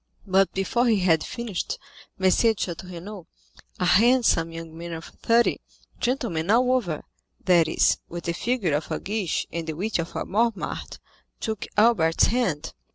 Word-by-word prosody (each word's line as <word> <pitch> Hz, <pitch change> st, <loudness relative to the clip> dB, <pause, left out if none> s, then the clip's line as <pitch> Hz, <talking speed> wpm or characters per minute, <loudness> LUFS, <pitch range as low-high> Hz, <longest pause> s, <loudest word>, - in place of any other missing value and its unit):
But 195 Hz, 0 st, +3 dB
before 235 Hz, +6 st, +1 dB
he 215 Hz, -4 st, +3 dB
had 165 Hz, -3 st, +3 dB
finished, 235 Hz, -7 st, -4 dB, 0.4 s
M. -, -, -8 dB
de 190 Hz, -, +6 dB
Château 190 Hz, -5 st, 0 dB
Renaud, 180 Hz, 0 st, -9 dB, 0.5 s
a 180 Hz, -, +1 dB
handsome 220 Hz, -4 st, +4 dB
young 165 Hz, -1 st, -8 dB
man 170 Hz, +1 st, -7 dB
of 160 Hz, 0 st, -7 dB, 0.2 s
thirty, 235 Hz, +1 st, +3 dB, 0.4 s
gentleman 225 Hz, -10 st, -1 dB
all 250 Hz, +3 st, +4 dB
over,—that 175 Hz, -4 st, 0 dB
is, 160 Hz, -, +2 dB
with 175 Hz, 0 st, -6 dB
the 170 Hz, -, -1 dB
figure 215 Hz, -, -1 dB
of 150 Hz, +2 st, -1 dB
a -, -, -2 dB
Guiche 205 Hz, -3 st, -2 dB
and 170 Hz, -1 st, -4 dB
the 160 Hz, -, -2 dB
wit 195 Hz, +5 st, -2 dB
of 170 Hz, +1 st, -4 dB
a -, -, -2 dB
Mortemart,—took 220 Hz, 0 st, -3 dB
Albert's 210 Hz, -7 st, +4 dB
hand. 180 Hz, -11 st, 0 dB
190 Hz, 155 wpm, -25 LUFS, 165-230 Hz, 0.5 s, de